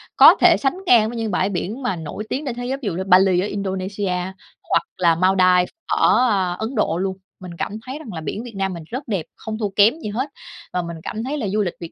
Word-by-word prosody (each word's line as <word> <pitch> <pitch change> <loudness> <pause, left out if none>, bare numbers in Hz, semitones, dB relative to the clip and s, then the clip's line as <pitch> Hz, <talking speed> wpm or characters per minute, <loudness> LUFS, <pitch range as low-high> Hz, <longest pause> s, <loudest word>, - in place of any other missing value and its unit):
có - - +9
thể - - +7
sánh 285 +6 0
ngang 225 -8 +5
với 240 - -6
những 225 -2 -2
bãi 190 +2 +1
biển 200 +7 -4
mà 245 - 0
nổi 165 +5 -6
tiếng 290 +3 -3
trên 250 -4 -3
thế 245 0 -5
giới 265 +2 -2
ví - - -7
dụ 180 - -1
như 185 +2 -3
Bali 185 -1 +5
ở 190 - 0
Indonesia, 195 0 -3 0.6
hoặc - - +3
là 170 -2 +3
Maldives 185 0 +4 0.2
ở, 250 - +3
a, 190 -4 +1
Ấn 220 +8 -5
Độ 190 -6 +1
luôn. 190 +1 -2 0.2
Mình 185 -1 -9
cảm - - -3
thấy 265 +4 -6
rằng 235 -10 -9
là 160 - -5
biển 210 +9 -4
Việt 235 -3 -9
Nam 195 -1 -1
mình 170 -2 -7
rất 260 +4 -6
đẹp, 195 -8 -2
không 220 0 -6
thua 210 -2 -1
kém 210 +10 +4
gì 215 - -5
hết 255 +7 -2 0.4
và 180 - 0
mình 170 -1 -6
cảm 220 - -4
thấy 285 +4 -3
là 225 - -2
du 210 +2 0
lịch 180 -4 -1
Việt 170 - -8
200 Hz, 260 wpm, -21 LUFS, 185-235 Hz, 0.6 s, có